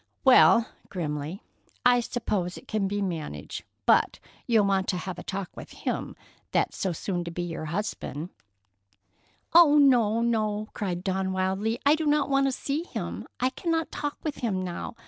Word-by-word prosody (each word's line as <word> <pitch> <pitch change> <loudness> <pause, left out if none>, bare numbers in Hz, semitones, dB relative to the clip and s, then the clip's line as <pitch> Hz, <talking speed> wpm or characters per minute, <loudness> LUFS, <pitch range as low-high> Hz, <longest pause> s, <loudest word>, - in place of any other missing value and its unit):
"Well"—grimly—"I 195 - +2
suppose 210 -7 -2
it - - -13
can 215 -3 0
be 205 +1 -1
managed, 155 - -5 0.2
but - - +4 0.3
you'll 225 -4 +4
want 195 -1 +1
to 180 - 0
have 180 0 -5
a - - -7
talk 195 -2 -5
with - - -10
him - - -3 0.4
that's - - +1
so 190 - -1
soon 175 +1 -3
to 170 - -5
be 175 +1 -4
your 165 -2 -4
husband——" 170 -2 -4 1.2
"Oh, 325 -3 +8
no, 235 -6 +5
no!" 215 -2 0
cried 180 -3 -3
Dawn 190 0 -1
wildly. 190 +4 0
"I 285 - +7
do 315 0 0
not 290 -1 +2
want 275 0 +3
to - - +1
see 280 +4 -2
him. - - -5
I 255 +1 +1
cannot 325 +3 -1
talk 290 -1 -3
with 305 -3 -3
him 195 -6 -1
now. 180 +5 -5
205 Hz, 165 wpm, -27 LUFS, 185-250 Hz, 1.2 s, Oh